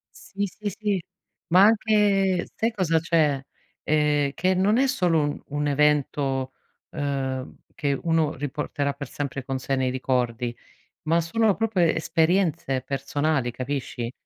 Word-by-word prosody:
Sì, 200 0 -4
sì, 205 +3 -5
sì. 205 -1 -2 0.5
Ma 180 +2 +5
anche 205 -4 +3
sai 225 +1 0
cosa 175 -7 +1
c'è: 155 -4 +2 0.4
ehm, 150 -2 +2
che 185 +5 +1
non 200 +5 +3
è 270 - +3
solo 180 -11 +2
un 145 0 -2
un 145 0 -1
evento, 140 -2 +1 0.4
ehm, 135 -3 -3 0.2
che 140 -2 0
uno 160 -2 +1
riporterà 145 0 -2
per 140 0 -7
sempre 135 0 -4
con 135 0 -3
sé 135 +1 -1
nei 130 -1 0
ricordi, 125 -2 -1 0.5
ma 165 +2 +2
sono 210 +5 +2
proprio 225 -3 -1
esperienze 165 -3 +1
personali, 140 0 -1
capisci? 125 -2 -4
150 Hz, 135 wpm, -25 LUFS, 135-185 Hz, 0.5 s, Ma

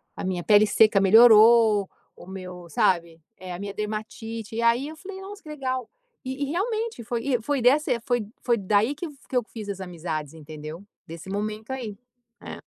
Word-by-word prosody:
a - - -6
minha 180 -2 -2
pele 210 0 +6
seca 215 -1 +4
melhorou, 220 0 +6 0.3
o - - -13
meu" 180 -2 -8
sabe. 165 0 +1 0.2
É, 185 -1 -8
"a 175 - -7
minha 200 0 -5
dermatite". 220 +1 -5
E 230 - -1
aí, 235 +4 +2
eu 315 - -8
falei: 380 +3 -9
"Nossa, 405 +1 -10
que 305 - -12
legal." 260 -4 -3 0.4
E 260 +2 -5
e, - - +1
realmente 440 - -2
foi 235 +1 -3
e 255 -4 0
foi 275 +3 -1
dessa 275 +6 +3
e 235 - +1
foi 240 -3 -1
foi 235 -2 +1
daí 210 +7 +1
que 340 +3 -5 0.2
que 255 - 0
eu 245 - +2
fiz 215 -2 -9
as 195 -1 -4
amizades, 160 -4 -5
entendeu. 155 +2 -9 0.2
Desse 165 +3 -9
momento 215 +4 -4
aí. 235 -6 -5 0.5
É. - - -9
220 Hz, 195 wpm, -25 LUFS, 190-255 Hz, 0.5 s, pele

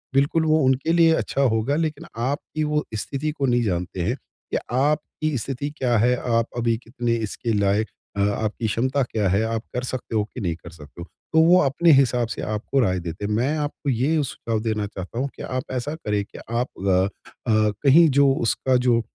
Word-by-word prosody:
बिल्कुल 145 +4 +3
वो 155 0 +3
उनके 135 +5 +2
लिए 165 -1 +5
अच्छा 140 - -1
होगा 120 +1 +2
लेकिन 155 -1 -2 0.2
आपकी 145 +4 -2
वो 150 0 0
स्थिति 140 +7 -2
को 140 -2 -2
नहीं 120 -1 +2
जानते 90 -2 -2
हैं 85 - 0
कि - - -7
आपकी 150 +2 0
स्थिति 135 +5 -3
क्या 120 -3 +2
है? 125 +3 +3
आप 115 -2 +1
अभी 115 -1 +1
कितने 120 0 -2
इसके 115 +2 -3
लायक 100 +1 +2 0.3
अ, 100 - +1
आपकी 105 +2 0
क्षमता 130 +6 0
क्या 110 -4 -1
हैं? 100 +4 +2
आप 115 -1 -2
कर 125 - -1
सकते 125 -2 -4
हो 105 - +3
कि 120 +3 -9
नहीं 85 -4 -1
कर 85 - -12
सकते 75 0 -12
हो? 85 - -6 0.3
तो 160 - +5
वो 180 +2 +6
अपने 150 +5 +3
हिसाब 125 -3 +3
से - - -5
आपको 110 +6 -1
राय 95 -7 +2
देते 85 +4 -5
हैं। 105 - -2
मैं 130 +8 +1
आपको 145 -1 -3
ये 145 +5 +1
सुझाव 115 -4 -3
देना 110 -2 -1
चाहता 100 +4 -7
हूँ 140 - 0
कि - - -10
आप 130 0 -3
ऐसा 130 +4 -2
करें 105 -9 -2
कि - - -12
आप 120 +2 0
अ 95 0 +2 0.4
अ, 110 -1 +3
कहीं 160 +4 +7
जो 140 0 +4
उसका 130 +2 +1
जो 125 -2 +3
120 Hz, 205 wpm, -23 LUFS, 105-140 Hz, 0.4 s, कहीं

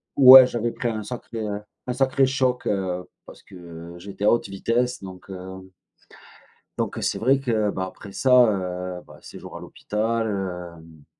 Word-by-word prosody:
Ouais, 130 -1 +10
j'avais 120 -1 -2
pris 120 - -4
un 110 -2 -4
sacré, 120 0 -7
heu, 105 -1 -4 0.2
un 125 - -2
sacré 135 +1 +2
choc, 130 -1 0
heu, 95 -2 -2 0.2
parce - - -15
que 85 -2 -11
j'étais 100 +3 -6
à - - +5
haute 120 - +1
vitesse 120 +5 -1
donc, 95 0 -11
heu 95 0 -9 1.1
donc, - - -2
heu, - - -6
c'est - - -1
vrai 135 +4 +3
que, 110 -5 0
bah, 95 -1 -3
après 100 +2 -11
ça, 130 +5 +1 0.2
heu, 90 -2 -4
bah, - - -15
séjour - - -11
à - - -8
l'hôpital, 115 +2 -3
heu 90 -6 -6
100 Hz, 170 wpm, -23 LUFS, 90-120 Hz, 1.1 s, Ouais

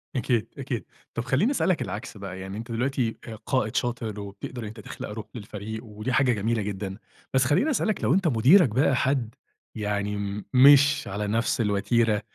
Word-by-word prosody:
أكيد، 120 -2 0
أكيد، 125 -8 -4 0.3
طب 115 - -2
خلّيني 180 - +2
اسألك 185 - +1
العكس 105 0 -5
بقى، 95 -1 -7
يعني 95 +2 -6
أنت 115 +1 -7
دلوقتي 125 -1 -1
آآ، 110 - -6
قائد 110 -1 -1
شاطر، 115 -3 -2
وبتقدر 100 +5 -7
إن 110 - -5
أنت 110 +1 -10
تخلق 105 - -7
روح 105 0 -6
للفريق 110 +1 -6
ودي 105 +3 -5
حاجة 135 -4 +4
جميلة 110 +1 0
جدًا، 100 -1 -4 0.4
بس 130 -1 +4
خلّيني 150 - +2
اسألك 215 -5 0
لو - - +3
أنت 190 -2 +2
مديرك 140 - +6
بقى 130 +4 +2
حد 130 -4 0 0.4
يعني 105 -1 -2
م 100 0 -4
مش 145 +3 +6
على 105 +2 -3
نفس 115 +4 0
الوتيرة 105 +1 +2
115 Hz, 180 wpm, -26 LUFS, 105-130 Hz, 0.4 s, مديرك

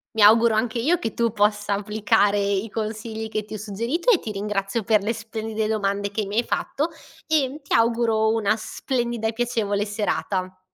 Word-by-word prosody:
Mi 220 - +2
auguro 225 +2 +7
anche 230 +1 0
io 325 +8 +2
che 225 - -4
tu 235 -1 +1
possa 210 -1 +1
applicare 210 0 +2
i 200 +1 0
consigli 220 +1 -4
che 215 -1 -3
ti 215 +1 -9
ho 215 - -4
suggerito 230 - -1
e 410 - +5
ti 220 - -6
ringrazio 200 +1 -2
per 215 -1 +3
le 215 +3 0
splendide 220 -1 -4
domande 200 -2 -1
che 210 0 -2
mi 205 +2 -5
hai - - +4
fatto. 295 +5 -1 0.4
E 295 -2 +1
ti - - -7
auguro 230 -1 +3
una 215 -1 +2
splendida 235 0 -2
e - - -2
piacevole 220 -4 -1
serata. 195 -3 -2
220 Hz, 185 wpm, -23 LUFS, 205-230 Hz, 0.4 s, auguro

